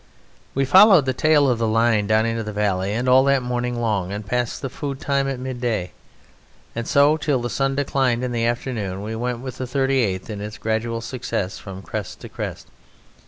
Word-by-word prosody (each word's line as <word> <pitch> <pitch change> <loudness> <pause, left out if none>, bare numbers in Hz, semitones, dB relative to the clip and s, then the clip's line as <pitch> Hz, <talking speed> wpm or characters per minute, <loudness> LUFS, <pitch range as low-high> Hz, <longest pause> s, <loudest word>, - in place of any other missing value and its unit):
We 135 0 +2
followed 190 +1 +7
the 130 - 0
tail 150 +2 +3
of 125 -3 +1
the 115 - +1
line 110 -2 +2
down 110 +1 +3
into 115 0 -1
the 105 -1 -5
valley, 100 -2 0
and 120 +4 -1
all 130 +1 +6
that 140 -2 +3
morning 125 0 -2
long 105 -5 -1
and 105 +1 -5
past 125 +4 -2
the - - -1
food 140 -1 -5
time 140 -1 0
at 135 -2 -3
midday, 120 -7 -3 0.8
and 115 0 -4
so 145 +2 +4
till 145 -3 0
the 120 0 -4
sun 135 0 0
declined 135 -3 0
in 125 - -2
the 115 -1 0
afternoon, 110 -6 -3
we 110 +2 -4
went 120 +1 -3
with 130 -1 -7
the 130 - -2
38th 130 -7 0
in 105 -1 -6
its 105 +1 -6
gradual 115 +1 -2
success 115 -5 -4
from 95 -1 -9
crest - - -6
to - - -9
crest. - - -6
120 Hz, 205 wpm, -22 LUFS, 110-135 Hz, 0.8 s, followed